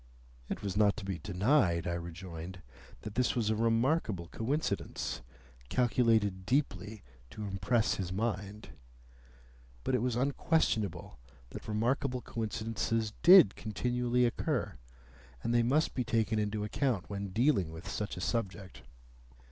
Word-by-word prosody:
It - - -4
was 100 -2 -3
not 105 -1 +3
to 105 - -6
be 95 -4 -3
denied, 95 - +2
I 85 - -1
rejoined, 85 +1 -7 0.4
that 110 - -7
this 125 +3 +1
was 110 -3 +1
a - - +1
remarkable 115 - +1
coincidence, 140 +8 -2 0.5
calculated 115 - +2
deeply 105 -4 -1 0.3
to 105 - -7
impress 100 +3 +1
his 90 -2 -3
mind. 105 0 -3 1.1
But - - -1
it 125 - +2
was 125 -1 0
unquestionable 125 - 0 0.3
that - - -8
remarkable 125 +4 0
coincidences 110 0 -2
did 175 - +8
continually 125 +3 0
occur, 120 - -1 0.7
and 115 - 0
they 120 - +4
must 140 +7 +2
be 125 - -1
taken 115 -1 +1
into 105 0 -1
account 105 -3 -1
in 100 0 -4
dealing 105 - +2
with 80 +2 -9
such 105 -3 -4
a - - -5
subject. 95 - -3
110 Hz, 130 wpm, -32 LUFS, 95-120 Hz, 1.1 s, did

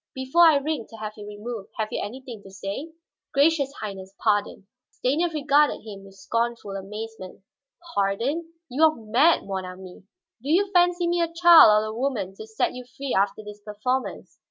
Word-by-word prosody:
"Before 265 +7 +4
I 315 - +6
ring 285 -4 -3
to - - -12
have 215 -1 -6
you 210 -1 -10
removed, 210 0 -7
have 215 -1 -2
you - - -2
anything 240 0 -8
to 195 - -14
say?" 195 +11 -6 0.4
"Gracious 285 -1 +3
Highness, 195 -2 -7
pardon!" 205 -2 0 0.2
Stanief 315 +7 0
regarded 295 -1 +2
him 200 -2 -9
with 195 0 -15
scornful 230 +2 -2
amazement. 195 0 -8 0.5
"Pardon? 240 +12 -1 0.2
You 265 +4 -4
are 310 -1 +3
mad, 235 +9 +3
mon 190 -1 -3
ami. 185 0 -10 0.4
Do 275 - -6
you 385 +5 +2
fancy 355 -1 +3
me 345 0 +1
a 335 -1 0
child 335 -11 +7
or - - -3
a 215 - -5
woman 225 -6 -2
to 220 - -9
set 220 - -1
you 250 - -8
free 275 -1 -3
after 200 +2 0
this 210 0 -11
performance? 220 +5 -4
230 Hz, 180 wpm, -25 LUFS, 205-295 Hz, 0.5 s, child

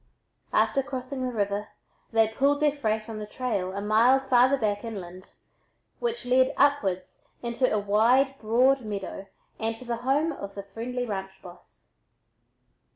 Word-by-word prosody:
After 275 - +2
crossing 260 -1 -5
the 255 -1 -1
river 205 -2 -1 0.4
they 225 -1 +4
"pulled 275 +6 +1
their 300 -1 +3
freight" 220 -6 -2
on 220 -2 -6
the 210 - -6
trail 210 -6 -2
a 200 - -4
mile 225 +5 +5
farther 265 0 +3
back 205 -4 -1
inland, 185 -5 -7 0.7
which 475 - -3
led 255 +1 +3
upwards 245 -11 +1 0.2
into 240 +2 0
a 215 - +2
wide 230 +7 +3
broad 250 +5 +3
meadow 200 -2 -6 0.3
and 225 0 -1
to 250 - -12
the 235 -1 -2
home 275 +7 +1
of 200 -8 -8
a 200 - -4
friendly 235 +5 -4
ranch 195 -3 -5
boss. 175 -1 -15
230 Hz, 155 wpm, -27 LUFS, 205-260 Hz, 0.7 s, mile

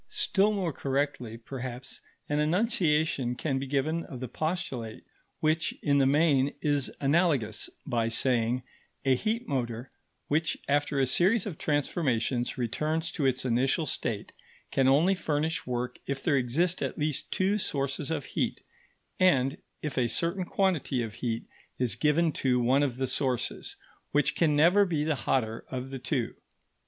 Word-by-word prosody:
Still 200 +2 +2
more 190 -6 -1
correctly, 135 -4 -2
perhaps, 125 +1 -7 0.3
an 145 0 0
enunciation 155 - +1
can 135 0 -1
be 135 - -4
given 150 +5 0
of 130 - -8
the 130 - -4
postulate 145 -7 -3 0.4
which, 155 +1 +1
in 140 -1 +3
the 135 - +4
main, 140 -2 +3
is 145 -2 0
analogous, 140 -8 +1 0.2
by 115 -4 0
saying: 120 +1 +1 0.4
A 135 - +5
heat 225 - -1
motor, 120 -2 -3 0.4
which 160 +2 +1
after 145 0 +1
a 135 - +4
series 185 - +3
of 185 -7 -6
transformations 135 -5 0
returns 155 +7 -1
to 145 -4 0
its 130 0 0
initial 130 +6 +2
state, - - -3 0.4
can 135 -1 +3
only 155 +8 +5
furnish 160 -4 -1
work 125 0 -3
if 135 -1 -3
there 155 - +3
exist 150 +8 +1
at - - -2
least 150 -2 -2
two 195 +3 +1
sources 140 -3 -2
of 160 -4 -2
heat, - - -2 0.6
and 140 -7 +3 0.2
if 150 -4 -2
a 120 -2 +2
certain 170 +8 0
quantity 170 -11 +1
of 110 -2 -5
heat 115 -1 -3 0.3
is 125 -2 0
given 160 +2 +2
to 130 -3 +1
one 130 +4 +3
of 130 -4 0
the 135 - 0
sources, 130 -1 -1 0.4
which 145 0 +2
can 155 -3 +3
never 175 +7 +6
be 165 -6 0
the 155 0 +1
hotter 115 -3 -1
of 130 +1 -5
the 135 - -5
two. 125 -1 -1
140 Hz, 155 wpm, -29 LUFS, 125-160 Hz, 0.6 s, never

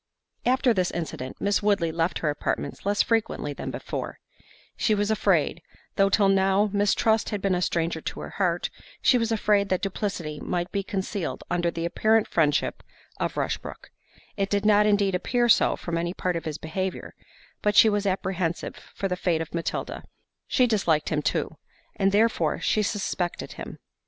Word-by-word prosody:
After 255 -1 +3
this 185 -3 +1
incident, 155 -6 -5
Miss 200 0 +1
Woodley 200 -6 +2
left 165 +2 0
her 150 - +3
apartments 145 +3 -3
less 205 0 +3
frequently 220 -10 -1
than - - -6
before—she 215 - -4
was 205 +1 0
afraid, 185 -6 +1 0.3
though 195 0 +4
till 200 0 +4
now 195 +1 +3
mistrust 205 +2 +2
had 210 - -2
been 195 -1 +1
a 180 - 0
stranger 165 -2 0
to - - -5
her - - -7
heart, 175 -2 +1 0.3
she 250 - +5
was 230 -1 0
afraid 205 -2 +2
that 185 - 0
duplicity 185 -6 -3
might 175 0 -2
be 200 - 0
concealed 195 -2 -3
under 175 0 +1
the 165 0 -3
apparent 215 +5 +2
friendship 150 -3 +1 0.4
of - - -2
Rushbrook; - - -4 0.5
it 195 -1 0
did 205 0 0
not 210 0 +5
indeed 200 -2 +3
appear 240 +7 +1
so 230 - +4
from 170 -1 -3
any 170 +2 -2
part 180 -1 -1
of 165 - -4
his 155 -2 -3
behaviour, 185 +4 -4 0.5
but 210 0 +1
she 225 - +8
was 205 -1 +1
apprehensive 185 -3 -2 0.2
for 195 - -1
the 180 - -1
fate 175 -2 0
of 165 - -5
Matilda; 170 -1 -3 0.4
she 255 - +3
disliked 180 -10 +1
him 150 -1 0
too, - - -1 0.4
and 195 -2 +2
therefore 220 +3 +2
she 215 - +1
suspected 195 -4 -2
him. - - -8
195 Hz, 170 wpm, -26 LUFS, 170-210 Hz, 0.5 s, she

